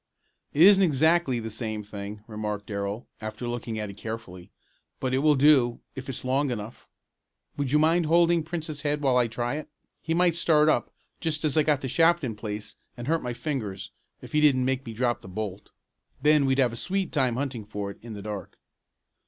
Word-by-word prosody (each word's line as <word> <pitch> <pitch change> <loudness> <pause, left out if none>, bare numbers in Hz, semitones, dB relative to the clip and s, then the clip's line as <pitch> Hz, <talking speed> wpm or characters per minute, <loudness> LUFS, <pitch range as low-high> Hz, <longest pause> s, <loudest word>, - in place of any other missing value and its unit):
"It 150 - +4
isn't 195 +1 +8
exactly 160 -4 +3
the 110 -1 -5
same 110 -1 -3
thing," 105 +1 -8
remarked 105 -2 -4
Darrell, 100 +2 -4 0.2
after 110 +2 -5
looking 120 -2 -4
at 105 -2 -4
it 100 - -14
carefully, 110 -6 -7 0.5
"but 130 -1 -1
it 130 - +3
will 150 +1 +4
do, 135 -4 +4
if 130 0 -8
it's 130 - -6
long 135 +2 +1
enough. 115 -1 -6 0.7
Would 140 -3 -2
you 150 - +5
mind 160 +2 +3
holding 170 +1 +4
Prince's 160 -2 -5
head 150 0 -1
while 135 -3 +2
I 125 -1 +4
try 120 +4 -2
it? 155 - -7 0.3
He 160 +1 -1
might 175 -1 +3
start 155 -2 +4
up, 120 - +1 0.3
just 155 -2 -1
as 150 - 0
I 155 - +5
got 150 -2 +1
the 130 - -3
shaft 165 +4 +3
in 115 -5 -2
place, 105 0 -6 0.2
and 120 - -6
hurt 165 +1 +1
my 125 -1 -3
fingers, 110 -9 -4 0.3
if - - -10
he 150 - +2
didn't 135 -4 +4
make 130 -1 -1
me 115 - -5
drop 120 +1 0
the - - -12
bolt. 100 0 -5 0.5
Then 150 0 +4
we'd 135 0 +2
have 125 -4 +3
a - - -5
sweet 190 +8 -2
time 130 -5 +1
hunting 130 -4 -3
for 100 -1 -5
it - - -14
in 115 -1 -8
the 100 - -8
dark." 105 -2 -6
130 Hz, 210 wpm, -26 LUFS, 110-150 Hz, 0.7 s, isn't